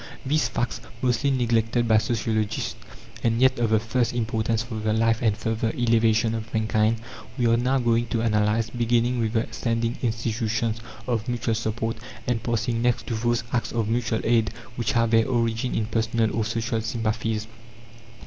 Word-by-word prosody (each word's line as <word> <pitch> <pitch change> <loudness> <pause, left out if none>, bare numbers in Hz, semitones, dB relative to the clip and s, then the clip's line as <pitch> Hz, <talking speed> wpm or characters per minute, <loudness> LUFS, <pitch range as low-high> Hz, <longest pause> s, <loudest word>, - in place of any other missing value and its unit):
These 150 -2 +2
facts, 115 +1 -2 0.2
mostly 125 +2 +2
neglected 120 -2 +1
by 110 -1 +5
sociologists 110 -1 -1 0.5
and 115 0 +2
yet 130 -1 +4
of 115 -2 +2
the 110 -1 +4
first 120 +2 0
importance 110 -1 0
for 115 -2 -5
the 110 0 0
life 115 0 +2
and 110 -3 +2
further 115 +1 -1
elevation 115 -1 +3
of 115 0 -5
mankind, 110 0 +1 0.4
we 125 - +1
are 115 0 +4
now 125 +3 +2
going 120 -1 +2
to 115 -1 -1
analyze, 110 0 +1
beginning 120 +1 +1
with 110 -1 0
the 110 -1 +1
standing 115 0 -1
institutions 115 -1 -1 0.3
of 115 -2 -1
mutual 120 -1 0
support, 115 +1 -2 0.3
and 120 -2 0
passing 115 0 -1
next 120 -2 +1
to 115 - -3
those 120 +1 0
acts 120 - 0
of 115 -2 -1
mutual 115 -1 0
aid 115 -2 +3 0.3
which 120 -2 -1
have 115 -1 +2
their 115 +1 +4
origin 115 0 0
in 110 - 0
personal 110 0 0
or 115 - +1
social 115 0 -1
sympathies. 110 -1 -1
115 Hz, 170 wpm, -25 LUFS, 110-120 Hz, 0.5 s, by